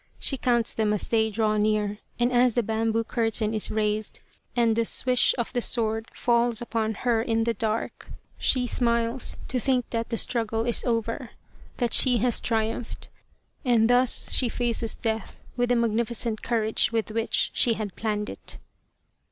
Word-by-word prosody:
She 275 - +2
counts 240 -3 +1
them 215 -1 0
as 210 - -1
they 220 -1 +2
draw 215 0 0
near, 210 -1 0 0.2
and 240 +1 +1
as 245 -1 +3
the 240 - +2
bamboo 225 +1 0
curtain 225 -2 0
is 215 - 0
raised 215 0 -1 0.4
and 230 -2 +3
the 230 - +2
swish 250 +2 +3
of 235 0 -3
the 245 - 0
sword 225 -1 0
falls 235 -1 +1
upon 225 -2 -2
her 235 -2 +3
in 225 -1 0
the 235 0 0
dark, 225 -1 -3 0.3
she 255 -1 +2
smiles 235 +1 0
to 250 - -1
think 255 -1 0
that 230 -1 -2
the 230 - -2
struggle 225 -1 0
is 240 - 0
over, 230 +1 -2 0.5
that 240 -3 -1
she 250 -2 +5
has 240 +1 +1
triumphed, 225 0 -3 0.5
and 240 -3 +3
thus 250 0 +3
she 250 - +3
faces 235 -1 -1
death 220 -1 -3 0.2
with 245 -1 0
the 245 - +3
magnificent 230 -1 0
courage 225 -1 +1
with 225 -1 -1
which 225 +1 0
she 235 - +2
had 210 -3 -5
planned 210 -1 -2
it. - - -7
230 Hz, 170 wpm, -25 LUFS, 220-240 Hz, 0.5 s, she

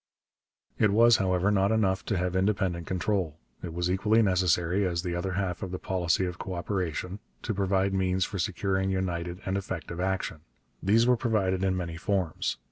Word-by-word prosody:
It 105 - +5
was, 115 +3 +6
however, 95 +1 +1
not 100 0 +2
enough 95 -4 +1
to 105 - 0
have 90 +1 -1
independent 95 -3 0
control. 90 -4 -1 0.2
It 85 - -5
was 85 +2 -1
equally 105 +4 +3
necessary, 90 -1 +2
as 85 -2 -1
the 90 -2 -2
other 90 +2 -2
half 90 -2 -2
of 95 - -4
the 90 - -4
policy 90 -1 0
of 90 0 -5
co 95 - -4
operation, 90 +1 -3 0.2
to 110 - -1
provide 95 0 +1
means 95 0 +1
for 100 - -5
securing 95 +1 0
united 90 -1 -2
and 95 +1 -1
effective 85 -2 -6
action. 95 -3 -2 0.4
These 110 +4 +4
were 125 0 +4
provided 100 -6 0
in 95 -1 +1
many 85 -2 -4
forms. 90 -2 -1
95 Hz, 180 wpm, -28 LUFS, 90-100 Hz, 0.4 s, was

